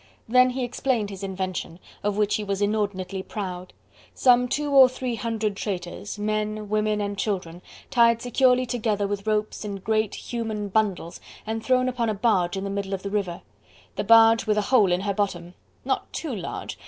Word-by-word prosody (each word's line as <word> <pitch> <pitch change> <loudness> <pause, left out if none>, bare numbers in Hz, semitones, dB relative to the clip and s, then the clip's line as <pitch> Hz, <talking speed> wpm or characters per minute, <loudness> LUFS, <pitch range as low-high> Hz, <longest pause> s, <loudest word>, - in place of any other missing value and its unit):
Then 250 +2 +5
he 255 +1 -3
explained 245 -3 -1
his 195 -1 -8
invention, 185 -3 -4 0.2
of 205 0 -1
which 210 -1 +2
he 215 - -4
was 200 -1 -2
inordinately 205 -2 -1
proud. 185 -5 -6 0.4
Some 250 -1 +4
two 290 +3 -2
or 265 -2 +8
three 255 -1 -4
hundred 220 -2 -2
traitors, 195 0 -5
men, 215 0 -2
women, 215 0 +1
and 205 0 -2
children, 180 -5 -3 0.3
tied 235 -2 +4
securely 250 +1 +3
together 215 -4 -1
with 200 +1 -4
ropes 215 0 -1
in 205 -1 -4
great, 215 +2 -1
human 220 -3 -4
bundles 195 -5 -1 0.2
and 220 0 -3
thrown 255 0 +2
upon 240 -2 -1
a 215 - -1
barge 195 -4 +1
in 190 - -3
the 200 - -3
middle 200 -1 -2
of 190 - -9
the 200 - -4
river: 195 -5 -2 0.5
the - - -2
barge 225 0 +6
with 210 0 +2
a - - +3
hole 205 -7 +5
in 175 +1 +1
her 200 0 -1
bottom! 180 -4 -2 0.3
not - - -2
too 300 -7 -4
large! 185 - -6
210 Hz, 185 wpm, -25 LUFS, 195-230 Hz, 0.5 s, or